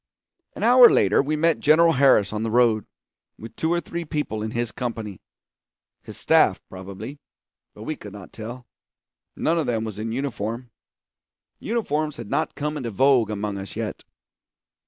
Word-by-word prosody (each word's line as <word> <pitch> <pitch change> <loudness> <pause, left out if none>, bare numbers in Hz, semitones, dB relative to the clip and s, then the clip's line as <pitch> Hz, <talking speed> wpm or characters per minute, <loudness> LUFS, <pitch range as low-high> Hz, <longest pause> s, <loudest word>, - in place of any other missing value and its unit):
An - - -6
hour 245 +1 +8
later - - +3
we 150 +3 -1
met 165 +1 +2
General 165 +2 +5
Harris 130 -8 +4
on 105 - -2
the 115 - -1
road, 115 -2 +2 0.5
with 115 - -11
two 160 - -1
or 175 - +2
three 170 0 -5
people 150 -8 -3
in 110 - -3
his 120 0 -3
company 110 -6 -5 0.8
his - - -11
staff, - - +3
probably, 95 +9 -9 0.6
but 105 - -10
we 155 +7 -3
could 105 -7 -11
not 100 -2 -12
tell; 120 +3 -8 0.7
none 165 +1 0
of 155 - -2
them 115 -2 -1
was 110 -2 -6
in 110 +1 -3
uniform; 120 -2 -4 0.9
uniforms 155 -10 -2
had 115 -3 -9
not 160 - -1
come 150 0 -3
into 125 -5 -4
vogue 125 0 +3
among 105 -1 -3
us 95 - -8
yet. - - -5
120 Hz, 165 wpm, -23 LUFS, 110-150 Hz, 0.9 s, hour